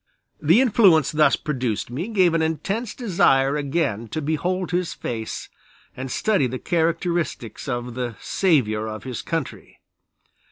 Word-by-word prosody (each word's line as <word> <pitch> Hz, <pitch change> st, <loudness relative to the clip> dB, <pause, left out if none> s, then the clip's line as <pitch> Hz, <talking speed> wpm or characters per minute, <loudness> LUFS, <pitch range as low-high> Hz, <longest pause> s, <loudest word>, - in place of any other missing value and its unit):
The 165 Hz, -, +5 dB
influence 195 Hz, -, +4 dB
thus 150 Hz, -2 st, +4 dB
produced 125 Hz, -6 st, -3 dB
gave 185 Hz, -, -4 dB
me 190 Hz, -2 st, +5 dB
an -, -, 0 dB
intense 195 Hz, +8 st, -2 dB
desire 140 Hz, -, +2 dB
again 140 Hz, -6 st, -1 dB
to 135 Hz, -, -4 dB
behold 175 Hz, +5 st, -1 dB
his 180 Hz, -1 st, -1 dB
face 110 Hz, -2 st, -5 dB, 0.5 s
and 130 Hz, +1 st, -5 dB
study 195 Hz, 0 st, +1 dB
the 130 Hz, +1 st, -4 dB
characteristics 170 Hz, -, -1 dB
of 120 Hz, -1 st, -3 dB
the 120 Hz, -2 st, -4 dB
"Savior 115 Hz, -, +1 dB
of 110 Hz, -1 st, -6 dB
his 125 Hz, -3 st, -5 dB
Country." -, -, -5 dB
150 Hz, 135 wpm, -23 LUFS, 125-175 Hz, 0.5 s, The